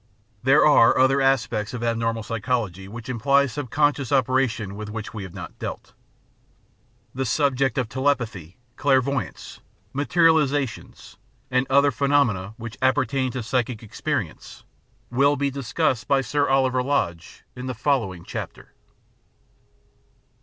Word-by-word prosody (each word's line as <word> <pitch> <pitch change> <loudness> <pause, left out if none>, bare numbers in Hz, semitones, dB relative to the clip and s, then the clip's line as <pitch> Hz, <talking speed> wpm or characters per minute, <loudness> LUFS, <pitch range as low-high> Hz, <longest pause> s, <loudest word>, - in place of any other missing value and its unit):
There 135 +5 +5
are 145 -6 +6
other 135 +1 +4
aspects 125 -4 0
of 120 - -5
abnormal 115 -1 -1
psychology 110 -4 -2
which 115 +3 -9
imply 140 +3 +2
subconscious 145 0 -1
operations 130 -6 +1
with 105 +1 -7
which 110 0 -6
we 110 - -6
have 95 -3 -9
not - - -9
dealt. - - -6 1.2
The 130 - -2
sub 140 +2 +1
ject 135 -1 0
of 125 -4 0
telepathy, 115 - -2 0.2
clairvoyance, 135 -2 0 0.3
materialisations, 145 -3 +1 0.3
and 125 +1 +1
other 140 +1 +4
phe 140 - -2
nomena 110 -8 +1
which 120 -1 -8
appertain 130 -1 +1
to 125 - -4
psychic 120 -1 -2
experience 110 - -4 0.5
will 140 +4 +3
be 140 -1 -1
discussed 135 -1 -1
by 140 -1 +3
Sir 145 +3 0
Oliver 130 -1 +2
Lodge 90 -12 -2
in 125 +1 -6
the 130 - -4
following 110 - -1
chapter. - - -7
130 Hz, 130 wpm, -23 LUFS, 115-140 Hz, 1.2 s, are